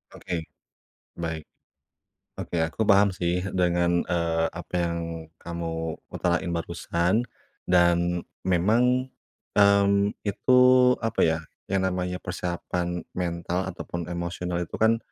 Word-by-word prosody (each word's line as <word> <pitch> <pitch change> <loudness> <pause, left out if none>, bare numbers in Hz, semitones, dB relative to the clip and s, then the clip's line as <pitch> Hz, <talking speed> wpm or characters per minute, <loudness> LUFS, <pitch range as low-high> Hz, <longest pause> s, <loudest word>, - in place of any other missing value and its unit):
Oke. 85 -2 -3 0.8
Baik. 80 -2 -3 0.9
Oke. 85 - -5
Aku 80 +7 -3
paham 100 -2 +4
sih 90 0 0 0.2
dengan, 85 -1 +2
eee, 85 -1 +1
apa 90 +1 -9
yang 85 -1 0 0.4
kamu 80 -1 -4 0.2
utarain 85 0 0
barusan 85 +4 0 0.5
dan 85 0 +3 0.2
memang, 115 +8 +2 0.5
mmm, 100 0 +4 0.2
itu, 125 +5 +3 0.4
apa 115 -1 -2
ya, 80 0 +3 0.3
yang 95 -1 +2
namanya 90 0 -2
persiapan 90 -1 -3
mental 90 +1 -2
ataupun 85 -1 -6
emosional 85 0 -3
itu - - -14
kan, 115 +1 +3
90 Hz, 105 wpm, -26 LUFS, 85-95 Hz, 0.9 s, paham